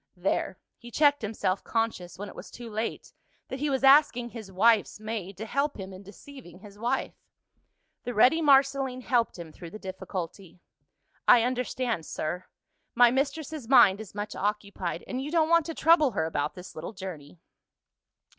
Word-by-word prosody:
There, -, -, -1 dB, 0.2 s
he 240 Hz, -, -11 dB
checked 290 Hz, +3 st, +3 dB
himself; 205 Hz, -3 st, -2 dB
conscious, 225 Hz, -7 st, -2 dB
when 205 Hz, +2 st, -6 dB
it -, -, -10 dB
was -, -, -10 dB
too 235 Hz, -2 st, -10 dB
late, 220 Hz, +2 st, -4 dB, 0.4 s
that 265 Hz, -, -5 dB
he 295 Hz, +1 st, 0 dB
was 265 Hz, -1 st, -1 dB
asking 270 Hz, -3 st, +5 dB
his 220 Hz, -5 st, -9 dB
wife's 215 Hz, +3 st, +3 dB
maid 215 Hz, -3 st, -5 dB
to 220 Hz, -, -5 dB
help 280 Hz, +5 st, -1 dB
him 190 Hz, -1 st, -7 dB
in 185 Hz, -, -10 dB
deceiving 200 Hz, -, -13 dB
his 205 Hz, +1 st, -14 dB
wife. 245 Hz, +4 st, -1 dB, 0.9 s
The 245 Hz, -, -5 dB
ready 260 Hz, +10 st, +5 dB
Marceline 275 Hz, -3 st, +3 dB
helped 240 Hz, -4 st, 0 dB
him 170 Hz, -2 st, -9 dB
through 170 Hz, +2 st, -10 dB
the 215 Hz, -, -9 dB
difficulty. 185 Hz, -2 st, -7 dB, 0.7 s
"I 240 Hz, -2 st, +7 dB
understand, 245 Hz, -6 st, -2 dB
sir: 175 Hz, +4 st, -4 dB, 0.5 s
my 240 Hz, 0 st, +6 dB
mistress's 280 Hz, 0 st, -2 dB
mind 225 Hz, -6 st, +6 dB
is 210 Hz, -2 st, -11 dB
much 205 Hz, 0 st, -5 dB
occupied 200 Hz, -4 st, -3 dB
and 255 Hz, 0 st, -4 dB
you 280 Hz, -, -5 dB
don't 320 Hz, -1 st, +2 dB
want 335 Hz, -1 st, +4 dB
to 330 Hz, -, -5 dB
trouble 310 Hz, -5 st, +4 dB
her 160 Hz, -, 0 dB
about 150 Hz, -2 st, -2 dB
this 180 Hz, 0 st, -10 dB
little 165 Hz, +7 st, -7 dB
journey." 180 Hz, -5 st, -9 dB
225 Hz, 170 wpm, -27 LUFS, 190-265 Hz, 0.9 s, I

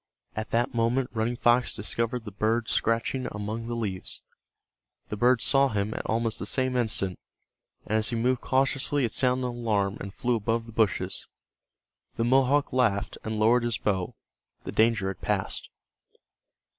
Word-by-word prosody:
At 110 Hz, 0 st, -4 dB
that 120 Hz, +3 st, +1 dB
moment 120 Hz, +2 st, +1 dB
Running 115 Hz, +2 st, 0 dB
Fox 120 Hz, +1 st, +3 dB
discovered 115 Hz, +3 st, -3 dB
the 105 Hz, -, -6 dB
bird 110 Hz, +3 st, 0 dB
scratching 115 Hz, +3 st, 0 dB
among 105 Hz, +3 st, -4 dB
the 120 Hz, -, -3 dB
leaves. 100 Hz, -5 st, -3 dB, 0.9 s
The -, -, -3 dB
bird 120 Hz, +2 st, +3 dB
saw 140 Hz, 0 st, +4 dB
him 105 Hz, -3 st, -1 dB
at -, -, -4 dB
almost 115 Hz, 0 st, 0 dB
the -, -, -4 dB
same 130 Hz, -1 st, 0 dB
instant, 105 Hz, -6 st, -1 dB, 0.7 s
and 110 Hz, +1 st, +1 dB
as 110 Hz, -, +2 dB
he 120 Hz, -, -2 dB
moved 125 Hz, +2 st, +1 dB
cautiously 135 Hz, +1 st, +1 dB
it 115 Hz, -, -3 dB
sounded 125 Hz, 0 st, +1 dB
an 120 Hz, -1 st, -5 dB
alarm 105 Hz, -4 st, 0 dB
and 100 Hz, -, -6 dB
flew 120 Hz, +4 st, 0 dB
above 115 Hz, +1 st, -1 dB
the 115 Hz, -, -11 dB
bushes. 110 Hz, -2 st, 0 dB, 0.9 s
The 115 Hz, -, 0 dB
Mohawk 135 Hz, +3 st, +3 dB
laughed 110 Hz, -6 st, +1 dB
and 110 Hz, 0 st, -3 dB
lowered 115 Hz, +3 st, +4 dB
his 120 Hz, -2 st, -1 dB
bow. 95 Hz, -4 st, -1 dB, 0.5 s
The -, -, -5 dB
danger 110 Hz, -3 st, +2 dB
had 95 Hz, -, -7 dB
passed. -, -, -1 dB
115 Hz, 165 wpm, -27 LUFS, 110-125 Hz, 0.9 s, saw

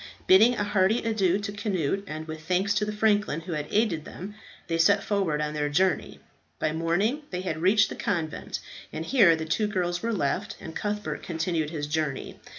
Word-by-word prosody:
Bidding 220 Hz, +6 st, +6 dB
a 210 Hz, -, -1 dB
hearty 205 Hz, +2 st, +2 dB
adieu 200 Hz, -5 st, +2 dB
to 205 Hz, 0 st, -4 dB
Cnut, 195 Hz, -3 st, -1 dB
and 155 Hz, 0 st, -6 dB
with 155 Hz, 0 st, -6 dB
thanks 185 Hz, +4 st, +1 dB
to 210 Hz, 0 st, +1 dB
the 210 Hz, -, -3 dB
franklin 210 Hz, -6 st, +1 dB
who 175 Hz, +2 st, -7 dB
had 150 Hz, -2 st, -3 dB
aided 205 Hz, -8 st, +1 dB
them, 195 Hz, +6 st, -8 dB, 0.3 s
they 165 Hz, -1 st, -1 dB
set 200 Hz, +4 st, +4 dB
forward 190 Hz, -8 st, 0 dB
on 150 Hz, 0 st, -2 dB
their 150 Hz, -1 st, -1 dB
journey. 185 Hz, +4 st, +1 dB, 0.4 s
By 155 Hz, -, 0 dB
morning 175 Hz, -, 0 dB
they 180 Hz, -1 st, -3 dB
had 160 Hz, -4 st, -3 dB
reached 200 Hz, +4 st, +4 dB
the -, -, -6 dB
convent, 165 Hz, -6 st, -3 dB, 0.3 s
and 160 Hz, -, -5 dB
here 200 Hz, -10 st, +5 dB
the 160 Hz, 0 st, -4 dB
two 210 Hz, +7 st, 0 dB
girls 180 Hz, -4 st, -1 dB
were 230 Hz, -, -1 dB
left, 200 Hz, +1 st, -1 dB
and 160 Hz, -, -9 dB
Cuthbert 210 Hz, 0 st, -3 dB
continued 165 Hz, -2 st, -2 dB
his 150 Hz, -2 st, -3 dB
journey. 150 Hz, -2 st, -3 dB
185 Hz, 195 wpm, -27 LUFS, 160-205 Hz, 0.4 s, Bidding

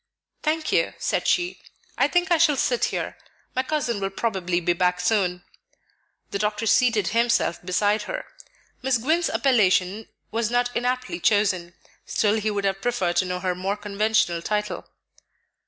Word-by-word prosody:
"Thank 310 Hz, 0 st, -1 dB
you," -, -, +1 dB
said -, -, -1 dB
she; 355 Hz, 0 st, +1 dB, 0.4 s
"I -, -, +3 dB
think 355 Hz, +1 st, +1 dB
I 340 Hz, -, +4 dB
shall 305 Hz, -3 st, +5 dB
sit 245 Hz, -1 st, +1 dB
here. -, -, -4 dB, 0.4 s
My 260 Hz, -, +2 dB
cousin 260 Hz, -6 st, -1 dB
will 195 Hz, 0 st, -1 dB
probably 190 Hz, -4 st, -1 dB
be 175 Hz, 0 st, +1 dB
back 180 Hz, +1 st, +1 dB
soon." 180 Hz, -2 st, +1 dB, 0.9 s
The 200 Hz, -, -2 dB
doctor 210 Hz, +1 st, -1 dB
seated 225 Hz, -3 st, +3 dB
himself 230 Hz, -7 st, +1 dB
beside 205 Hz, +4 st, +1 dB
her. -, -, -4 dB, 0.6 s
Miss 260 Hz, -1 st, +2 dB
Gwynne's 320 Hz, +8 st, +1 dB
appellation 210 Hz, -5 st, +2 dB, 0.2 s
was 225 Hz, -1 st, 0 dB
not 245 Hz, 0 st, 0 dB
inaptly 250 Hz, +6 st, -1 dB
chosen, 185 Hz, -5 st, +1 dB, 0.3 s
still 215 Hz, +1 st, +1 dB
he 215 Hz, +1 st, -1 dB
would 200 Hz, -1 st, -2 dB
have 195 Hz, 0 st, -1 dB
preferred 190 Hz, -8 st, 0 dB
to 185 Hz, -, +3 dB
know 180 Hz, 0 st, -3 dB
her 185 Hz, -1 st, 0 dB
more 190 Hz, +3 st, -2 dB
conventional 210 Hz, -3 st, +1 dB
title. 210 Hz, -1 st, -2 dB
210 Hz, 155 wpm, -24 LUFS, 185-245 Hz, 0.9 s, shall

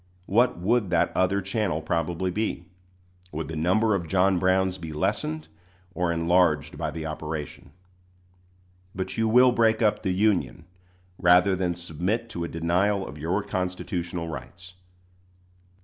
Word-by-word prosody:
What 120 Hz, +3 st, +2 dB
would 105 Hz, +3 st, +1 dB
that -, -, +1 dB
other 95 Hz, +2 st, +1 dB
channel 95 Hz, -4 st, -1 dB
probably 85 Hz, +3 st, -1 dB
be? 110 Hz, +4 st, -2 dB, 0.7 s
Would 80 Hz, +1 st, -5 dB
the 80 Hz, -, -5 dB
number 95 Hz, +8 st, +2 dB
of 85 Hz, -4 st, -2 dB
John 95 Hz, +2 st, +2 dB
Browns 95 Hz, 0 st, +1 dB
be 80 Hz, -2 st, -7 dB
lessened 105 Hz, -, -2 dB, 0.5 s
or 90 Hz, -2 st, 0 dB
enlarged 85 Hz, -3 st, +2 dB
by -, -, -3 dB
the 80 Hz, -1 st, -6 dB
operation? 75 Hz, -1 st, -6 dB, 1.3 s
But 95 Hz, 0 st, -4 dB
you 115 Hz, 0 st, +1 dB
will 125 Hz, +3 st, +6 dB
break 115 Hz, -1 st, +2 dB
up 105 Hz, -, +2 dB
the 95 Hz, -, -2 dB
Union 90 Hz, -, 0 dB, 0.5 s
rather 90 Hz, +2 st, +5 dB
than 90 Hz, -2 st, -1 dB
submit 90 Hz, +7 st, -3 dB
to 85 Hz, -7 st, -4 dB
a -, -, -2 dB
denial 90 Hz, +5 st, 0 dB
of 75 Hz, -, -9 dB
your 90 Hz, +7 st, -1 dB
constitutional 90 Hz, -2 st, -3 dB
rights. 85 Hz, +2 st, -9 dB
90 Hz, 140 wpm, -26 LUFS, 85-100 Hz, 1.3 s, will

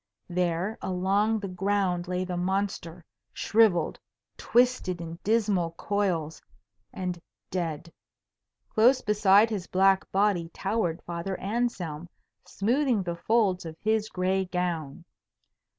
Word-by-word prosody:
There 180 Hz, +4 st, -1 dB
along 195 Hz, +4 st, +1 dB
the 200 Hz, -, -4 dB
ground 185 Hz, -1 st, 0 dB
lay 180 Hz, 0 st, -1 dB
the 180 Hz, -1 st, -4 dB
monster, 180 Hz, -2 st, -2 dB, 0.3 s
shrivelled, 210 Hz, -7 st, +2 dB, 0.4 s
twisted 245 Hz, -7 st, +1 dB
in 165 Hz, 0 st, -7 dB
dismal 205 Hz, -6 st, +1 dB
coils, 175 Hz, -5 st, -1 dB, 0.5 s
and 180 Hz, -6 st, -4 dB, 0.3 s
dead. 170 Hz, -2 st, -3 dB, 0.7 s
Close 245 Hz, +4 st, +4 dB
beside 210 Hz, +1 st, +4 dB
his 195 Hz, -4 st, -3 dB
black 190 Hz, +1 st, +3 dB
body 195 Hz, -4 st, +1 dB
towered 190 Hz, -5 st, -1 dB
Father 170 Hz, +3 st, -4 dB
Anselm, 185 Hz, -7 st, -2 dB, 0.4 s
smoothing 240 Hz, 0 st, +1 dB
the 170 Hz, -1 st, -3 dB
folds 195 Hz, 0 st, +1 dB
of 160 Hz, -1 st, -7 dB
his 220 Hz, 0 st, 0 dB
gray 190 Hz, +1 st, 0 dB
gown. 175 Hz, -3 st, -3 dB
190 Hz, 110 wpm, -27 LUFS, 175-210 Hz, 0.7 s, Close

